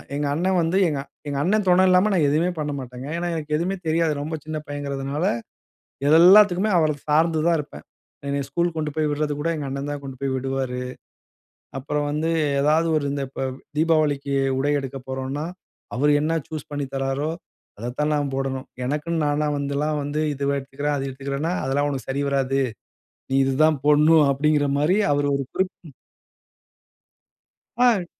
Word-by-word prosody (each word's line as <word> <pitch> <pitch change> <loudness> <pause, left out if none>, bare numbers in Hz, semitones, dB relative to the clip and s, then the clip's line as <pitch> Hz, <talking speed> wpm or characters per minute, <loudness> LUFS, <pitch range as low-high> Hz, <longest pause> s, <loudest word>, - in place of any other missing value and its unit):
எங்க 145 - -1
அண்ணே 180 +5 0
வந்து, 165 +3 +1
எங்க 145 - -2 0.3
எங்க 140 -1 -2
அண்ணே 215 +4 +2
துணை 180 +1 +5
இல்லாம, 185 +3 +4
நான் 165 -6 +3
எதுவுமே 165 +5 +2
பண்ணமாட்டேங்க. 135 -3 -5
ஏன்னா 175 0 -2
எனக்கு 150 -1 -2
எதுவுமே 185 +4 -1
தெரியாது. 160 0 +2
ரொம்ப 155 +2 -3
சின்ன 155 0 -4
பையங்கிறதுனால, 145 +2 -3 0.8
இதெல்லாத்துக்குமே 185 +5 +6
அவர 155 -1 +3 0.2
சார்ந்து 160 +1 +3
தான் 170 - +3
இருப்பேன். 145 - -10 0.4
என்னைய 140 0 -1
ஸ்கூல் 170 +4 0
கொண்டு 155 -1 -1
போய் 155 -1 +1
விட்றது 150 0 -1
கூட, 165 - -1
எங்க 145 - -4
அண்ணன் 140 +2 -4
தான் 145 - -6
கொண்டு 130 -2 -8
போய் 135 -1 -1
விடுவாரு. 130 -1 -2 1.0
அப்புறம் 145 +2 -2
வந்து 155 +2 -1 0.3
ஏதாவது 155 +3 +3
ஒரு 150 - 0
இந்த 140 - -2
இப்ப 135 - -6 0.4
தீபாவளிக்கு 150 -3 +2 0.2
உடை 145 +2 +1
எடுக்க 135 0 -6
போறோன்னா, 130 +3 -3 0.5
அவர் 145 +4 +3
என்ன 155 +2 0 0.2
சூஸ் 155 -2 -6
பண்ணி 145 -1 -2
தர்றாரோ, 135 +3 -1 0.5
அத 120 +3 -4
தான் 150 +1 +1
நான் 145 -2 -1
போடனும். 135 -1 -3 0.2
எனக்குன்னு 150 +4 -1
நானா 145 +1 +1
வந்தெல்லாம், 140 +2 -1
வந்து 145 +2 -2
இதுவே 140 +1 -1
எடுத்துக்கிறேன், 140 +2 -3
அது 135 -1 -2
எடுத்துக்கிறேன்னா, 140 +4 -3
"அதெல்லா 135 +2 +1
உனக்கு 135 -3 -4
சரி 140 +2 -1
வராது. 135 -1 +1 0.7
நீ 135 - 0
இது 135 0 0
தான் 155 -3 +3
போடனும்", 150 +1 +6
அப்டிங்கிற 145 +1 +2
மாரி 170 +8 +3
அவர் 145 0 +1
ஒரு 140 - -2
குறிப்பு 190 0 0
ம் 140 - -15 1.8
அ. 235 -7 +3
145 Hz, 165 wpm, -23 LUFS, 140-160 Hz, 1.8 s, இதெல்லாத்துக்குமே